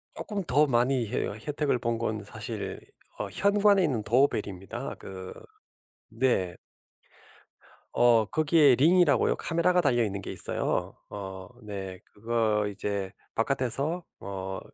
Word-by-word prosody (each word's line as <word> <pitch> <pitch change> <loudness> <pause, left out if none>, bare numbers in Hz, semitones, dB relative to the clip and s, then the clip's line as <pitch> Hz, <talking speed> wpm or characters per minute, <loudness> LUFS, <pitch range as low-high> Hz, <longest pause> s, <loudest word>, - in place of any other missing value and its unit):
쪼끔 205 -3 -4
더 145 +4 +3
많이 125 -1 +2
혜 - - -1
혜택을 140 +5 -2
본 115 0 -1
건 110 -3 -3
사실 - - -6 0.4
어 - - -3
현관에 200 0 +4
있는 125 -9 0
doorbell 120 0 +2
입니다. 95 0 -6
그 95 -1 -8 0.8
네. 115 -7 0 1.4
어. 120 -2 +5
거기에 150 -1 +4
링이라고요. 165 0 +4
카메라가 175 +2 +2
달려있는 115 - +1
게 - - -6
있어요. - - -1
어. 95 -2 -7
네. 95 -3 -6
그거 110 -1 0
이제 100 -1 -3 0.2
바깥에서 135 +7 0 0.2
어 95 -1 -5
120 Hz, 260 characters per minute, -28 LUFS, 100-145 Hz, 1.4 s, 어